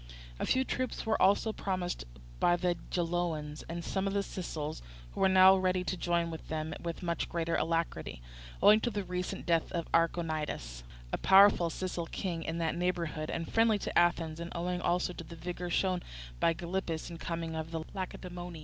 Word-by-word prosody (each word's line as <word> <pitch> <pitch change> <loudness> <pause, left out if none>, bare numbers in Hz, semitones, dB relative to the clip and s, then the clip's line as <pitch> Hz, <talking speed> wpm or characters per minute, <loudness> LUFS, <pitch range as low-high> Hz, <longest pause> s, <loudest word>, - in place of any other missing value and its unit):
A - - -1
few 260 - +3
troops 255 -1 -3
were 220 0 +1
also 205 +3 +4
promised 185 - -2 0.3
by 175 - +4
the 175 0 +1
Geloans 165 -4 -1
and 170 0 -4
some 195 0 -1
of 195 - -1
the 200 0 +1
Sicels, 155 -6 -5 0.3
who - - -8
were 190 - +5
now 190 0 +8
ready 185 -1 +1
to 185 - -2
join 170 -1 0
them 155 0 -3
with 170 +2 -5
much 170 -1 -1
greater 170 -1 -1
alacrity, 165 - -1 0.4
owing 210 +1 +8
to 240 - 0
the 205 -3 -3
recent 180 +1 -4
death 165 -2 +1
of 170 -2 -1
Archonidas, 155 - 0 0.3
a - - 0
powerful 195 -3 +7
Sicel 175 -1 -3
king 175 -4 -3
in 160 +1 -3
that 165 -1 0
neighbourhood 170 -3 -1
and 165 - -4
friendly 225 -1 +4
to - - -5
Athens, 165 -2 +2
and 170 0 -5
owing 175 +1 -2
also 180 +1 +1
to 170 - -7
the 170 +1 -10
vigour 175 +2 -5
shown 185 0 +1 0.4
by - - +4
Gylippus 175 -1 -3
in 170 - -8
coming 165 -1 -3
from 160 0 -5
Lacedaemon. 180 -2 -6
175 Hz, 180 wpm, -32 LUFS, 165-185 Hz, 0.4 s, now